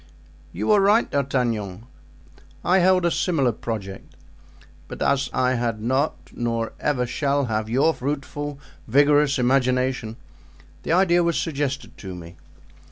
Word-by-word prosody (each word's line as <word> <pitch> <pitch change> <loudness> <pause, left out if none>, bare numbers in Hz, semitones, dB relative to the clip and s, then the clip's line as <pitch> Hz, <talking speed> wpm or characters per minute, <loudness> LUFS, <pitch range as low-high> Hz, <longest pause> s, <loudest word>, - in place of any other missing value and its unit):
"You - - -1
are 210 -2 +5
right, 210 +4 +4
D'Artagnan; 120 -8 -2 0.8
I 185 +2 +4
held 185 0 +3
a 170 - +2
similar 145 -10 +1
project, 105 -4 -7 0.7
but - - -8
as 140 -1 +1
I 130 0 +1
had 120 -3 -1
not 130 +7 0 0.2
nor 115 -1 -2
ever 130 -4 0
shall 140 +3 0
have 110 -2 -2
your 135 +7 +3
fruitful, 145 +1 -4 0.3
vigorous 145 +3 +4
imagination, 125 -2 +1 0.7
the - - -4
idea 175 -1 +4
was 170 -1 +1
suggested 145 -3 -3
to 95 -2 -7
me. 85 0 -11
135 Hz, 130 wpm, -23 LUFS, 115-150 Hz, 0.8 s, are